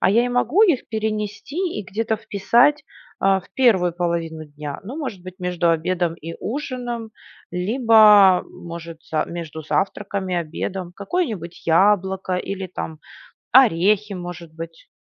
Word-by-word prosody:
А 185 - +3
я 235 +4 +4
и - - -2
могу 245 - +2
их 340 - +3
перенести 215 +5 -3 0.2
и - - -3
где-то 220 +3 -2
вписать, 240 +8 +2 0.3
а, 195 0 +3
в - - -22
первую 190 -10 +3
половину 170 -2 -2
дня? 145 -1 -7
Ну, 245 +9 -7
может 255 - -5
быть, 185 0 -10
между 180 -2 0
обедом 170 +1 0
и 165 0 -8
ужином, 240 -3 -4 0.4
либо, 210 -1 +6
может 170 -1 -9
за 155 -1 +1
между 160 -2 -7
завтраком 195 +3 -2
и 180 - -1
обедом. 175 +2 -4
Какое-нибудь 200 - -3
яблоко 190 +2 +2
или, 190 +1 -3
там, 160 -3 -6 0.6
орехи 210 -3 +4
может 175 -2 -7
быть. 165 0 -9
190 Hz, 140 wpm, -22 LUFS, 170-220 Hz, 0.6 s, либо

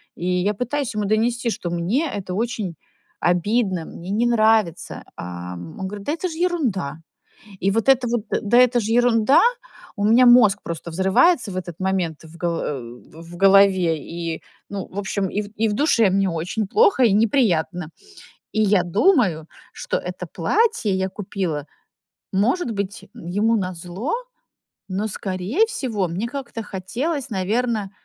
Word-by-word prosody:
и 175 - -6
я 180 +3 +1
пытаюсь 250 +3 -2
ему 210 - -1
донести, 235 +3 +1
что 175 - -4
мне 210 - 0
это 190 -3 -5
очень 215 -5 -2 0.4
обидно, 185 +1 +1
мне 180 +3 -8
не 225 +4 +1
нравится. 220 -6 +1
А 90 0 -6
он 85 -2 -9
говорит: 205 0 -8
"Да 295 - 0
это 335 +3 -3
ж 325 - -7
ерунда". 250 - -1 0.6
И 195 - +2
вот 225 +4 -1
это 265 -2 +5
вот 235 -2 -1 0.2
"да 235 +3 +3
это 250 -1 +5
же 220 +1 -2
ерунда", 240 +2 +4 0.6
у 205 - -2
меня 230 +4 +6
мозг 240 -5 +6
просто 170 0 -6
взрывается 200 - +3
в - - -6
этот 175 -1 -6
момент 185 -5 -1
в 160 +1 -13
голо 170 -1 -1
э, 140 -3 -3
в 160 +9 -12
голове 195 -3 +5
и, 165 0 -5 0.3
ну, 200 -2 -4
в 195 - -8
общем, 195 -1 -1
ив 205 +2 -3
и 225 - +1
в - - -1
душе 230 -6 +3
мне 195 +1 +2
очень 190 +6 -3
плохо 415 - +4
и 220 - +4
неприятно. 190 - +1 0.6
И 215 - 0
я 205 -3 +3
думаю, 185 - +2 0.3
что - - -3
это 180 0 -6
платье 345 - +1
я 190 0 -1
купила, 185 -7 -4 0.7
может 245 - +1
быть, 200 0 -5
ему 215 +3 0
назло, 180 - -4 0.8
но, 195 +3 -2
скорее 200 - -1
всего, 235 - -2
мне 190 +8 -3
как-то 245 -4 -6
хотелось, 245 - -3
наверно, 215 +1 -1
200 Hz, 155 wpm, -22 LUFS, 180-235 Hz, 0.8 s, меня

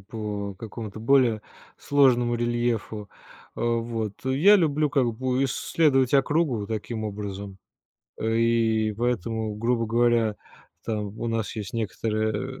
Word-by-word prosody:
по 100 -1 -5
какому-то 110 0 -8
более 115 -3 +3 0.4
сложному 125 -4 +3
рельефу. 120 -3 -1 0.5
Э, - - -7
вот, 115 -3 -1
я 155 +11 +5
люблю 155 -4 +1
как 125 -5 +2
бы 130 +2 0
исследовать 135 -1 +2
округу 140 -6 +2
таким 110 0 -4
образом. 100 -1 -6 0.6
Э, 110 +1 0
и 115 -2 +2
поэтому, 110 -1 -2
грубо 115 +1 0
говоря, 115 -1 +2 0.5
там 105 -1 -4
у 115 - -3
нас 115 -1 -2
есть 105 -2 -5
некоторые, 110 +2 -2
115 Hz, 120 wpm, -25 LUFS, 110-125 Hz, 0.6 s, я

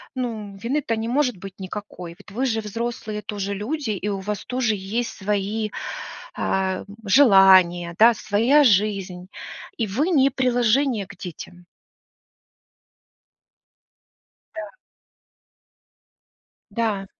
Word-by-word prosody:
ну, 220 -6 -4
вины-то 235 +3 -1
не 220 +1 -3
может 250 -3 +1
быть 195 +1 -10
никакой. 185 -2 -7
Ведь - - -16
вы 250 +6 -1
же 225 -3 0
взрослые 215 0 -4
тоже 200 -1 -4
люди, 235 +5 -3
и 205 0 -3
у 200 -1 -2
вас 205 +1 -4
тоже 250 -4 0
есть 210 +5 -3
свои, 210 +2 -1 0.7
а, 190 -1 0
м, - - -11 0.2
желания, 190 -7 +6
да, 235 +2 +8
своя 230 +8 +3
жизнь, 195 -5 +1 0.5
и 225 -3 -1
вы 275 - 0
не 275 -6 +4
приложение 250 -3 +1
к - - -12
детям. 180 0 -9 2.9
Да. 320 -1 -6 2.0
Да. 215 -4 -1
210 Hz, 110 wpm, -23 LUFS, 195-245 Hz, 2.9 s, да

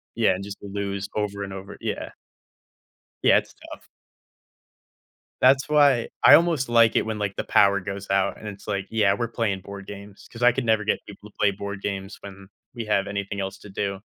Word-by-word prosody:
Yeah, - - +3
and 95 +2 -6
just 100 0 -8
to 100 - -9
lose 100 -1 -3
over 100 -1 -2
and 100 -1 -6
over, 95 0 -8
yeah. - - -4 1.1
Yeah, - - +6
it's - - -7 0.2
tough. - - -11 1.6
That's 135 +2 +5
why 145 -5 +4 0.2
I - - +10
almost 165 -7 +1
like 115 -1 +5
it - - +2
when 110 -1 -4
like, 100 -2 -2
the - - -1
power 100 -1 +4
goes 100 +1 -6
out, 95 -1 +1
and 110 - -10
it's 100 0 -9
like, 100 -1 -2
yeah, 105 -3 +3
we're 115 +3 -2
playing 110 -4 -2
board 100 -1 -10
games, 100 0 -11
'cause 115 - -10
I 125 0 +6
could 135 - -2
never 110 -2 +2
get - - -1
people 105 +1 -13
to - - -36
play 100 - +3
board 100 0 -6
games 95 0 -4
when 100 -1 -11 0.3
we 115 - -4
have 100 -2 0
anything 100 0 -4
else 95 0 -4
to 105 - -13
do. 100 0 -3
100 Hz, 210 wpm, -24 LUFS, 100-110 Hz, 1.6 s, I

